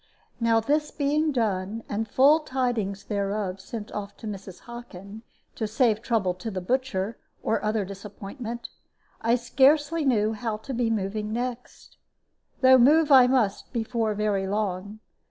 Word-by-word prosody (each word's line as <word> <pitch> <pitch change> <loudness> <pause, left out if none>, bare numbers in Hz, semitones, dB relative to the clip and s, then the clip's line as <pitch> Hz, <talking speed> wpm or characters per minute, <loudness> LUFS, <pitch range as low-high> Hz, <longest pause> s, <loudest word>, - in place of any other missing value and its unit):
Now 230 -1 +3
this 295 +6 0
being 300 +2 0
done, 215 -3 -1
and 220 +2 -2
full 280 +8 +5
tidings 245 -9 -2
thereof 200 -2 -2
sent 215 +1 -7
off 205 -1 -6
to - - -11
Mrs. 195 -3 -7
Hockin, 220 -4 -10 0.3
to 220 - -3
save 220 0 +2
trouble 225 -7 0
to 180 +5 -6
the 190 -3 -3
butcher, 220 -1 -2 0.2
or 225 - 0
other 215 -1 0
disappointment, 210 +5 -7 0.5
I 230 +1 +3
scarcely 290 +6 +3
knew 220 -5 +2
how 220 -1 -3
to 265 +5 -7
be 240 -1 0
moving 210 0 -2
next, 245 +1 -5 0.6
though 260 0 +7
move 300 +5 +5
I 260 -2 +8
must 245 -6 0
before 225 -2 -1
very 205 -2 0
long. 205 +1 -3
225 Hz, 145 wpm, -26 LUFS, 205-250 Hz, 0.6 s, I